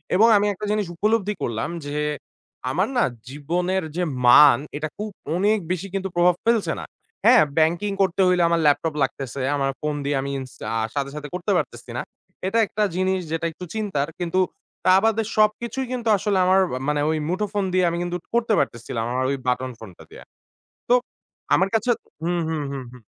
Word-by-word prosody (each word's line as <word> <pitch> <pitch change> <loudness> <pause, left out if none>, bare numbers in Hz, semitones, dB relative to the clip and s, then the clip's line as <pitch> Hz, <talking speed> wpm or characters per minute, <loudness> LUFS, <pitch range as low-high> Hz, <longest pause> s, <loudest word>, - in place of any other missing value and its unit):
এবং 220 +5 +6
আমি 205 - +2
একটা 210 +2 -6
জিনিস 210 -1 0
উপলব্ধি 210 +2 +1
করলাম 115 +3 -2 0.2
যে, 145 0 -5 0.8
আমার 185 +9 +1
না 245 - +4 0.3
জীবনের 175 +7 -1
যে 180 - 0 0.2
মান, 130 0 +8 0.2
এটা 155 +1 -2
খুব 210 +1 -4 0.3
অনেক 205 +4 +3
বেশি 185 +1 -2 0.3
প্রভাব 175 0 +4
ফেলছে 230 -2 +2
না। - - -6 0.4
হ্যাঁ, 240 +1 +8
ব্যাংকিং 170 +6 +2
করতে 190 0 +2
হইলে 180 -1 +3
আমার 170 0 +2
ল্যাপটপ 150 +2 +2
লাগতেছে। 135 0 -3
আমার 135 -1 0
ফোন 150 -1 -1
দিয়ে 145 +1 0
আমি 140 - -4
ইন্স 130 -1 -8 0.2
আ - - 0 0.2
সাথে, 140 -1 -1
সাথে 150 -1 -6
করতে 180 -1 -2
পারতেছি - - -4
না। - - -1 0.5
এটা 225 +4 +1
একটা 215 - -1
জিনিস 185 0 +1
যেটা 165 0 -1
একটু 180 +3 -9
চিন্তার। 195 -10 -1
কিন্তু 175 +1 0 0.5
তা 185 0 +6
বাদে 225 0 +2
সবকিছুই 230 +4 +1
কিন্তু 240 -2 -4
আসলে 200 0 0
আমার 190 +1 +5 0.2
আ - - -5
মানে 150 0 +1
ওই 160 - +1
মুঠোফোন 205 +2 -1
দিয়ে 185 -1 +3
আমি 170 - -3
কিন্তু 175 0 -2 0.2
করতে 235 -1 +2
পারতেছিলাম 115 -1 -2
আমার 130 +1 0
ওই 140 - -1
বাটন 125 +1 0
ফোনটা 95 -6 -12
দিয়ে। - - -12 0.7
তো 245 - +5 0.6
আমার 190 - +3
কাছে 225 +2 +1 0.3
হুম, 175 +1 0
হুম, 155 -2 -2
হুম, 135 -2 -5
হুম। 125 -2 -14
180 Hz, 185 wpm, -23 LUFS, 145-210 Hz, 0.8 s, মান